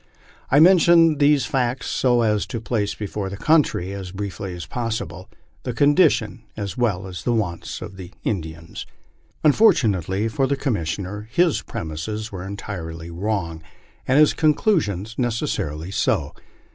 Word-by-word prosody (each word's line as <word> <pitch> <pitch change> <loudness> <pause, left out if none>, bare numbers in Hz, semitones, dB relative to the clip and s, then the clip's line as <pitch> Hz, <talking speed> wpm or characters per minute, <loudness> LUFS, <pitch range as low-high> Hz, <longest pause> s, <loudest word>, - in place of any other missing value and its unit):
I 140 - +5
mention 165 -2 +6
these 145 -1 +4
facts 130 -3 -1
so 120 -2 +2
as 105 -2 +1
to 115 - -4
place 110 -2 -2
before 105 -1 -4
the 100 - -7
country, 140 - +2
as 95 -2 -6
briefly 95 -1 -5
as 85 -3 -7
possible, 115 +5 -4 0.3
the 125 - -4
condition 130 - +3 0.2
as 100 -2 -4
well 105 -7 0
as 90 -4 -7
the - - 0
wants 100 -7 -3
of 95 - -9
the 90 -2 -8
Indians." 80 -4 -5 0.6
Unfortunately 110 - +3
for 130 +5 0
the 140 +1 0
Commissioner, 105 - -3
his 175 -3 +2
premises 105 +8 -5
were 95 -2 -6
entirely 85 -4 -6
wrong, 85 -3 -3 0.5
and 130 - +3
his 150 0 +6
conclusions 145 - +1
necessarily 95 - -2
so. - - 0
105 Hz, 140 wpm, -22 LUFS, 95-130 Hz, 0.6 s, mention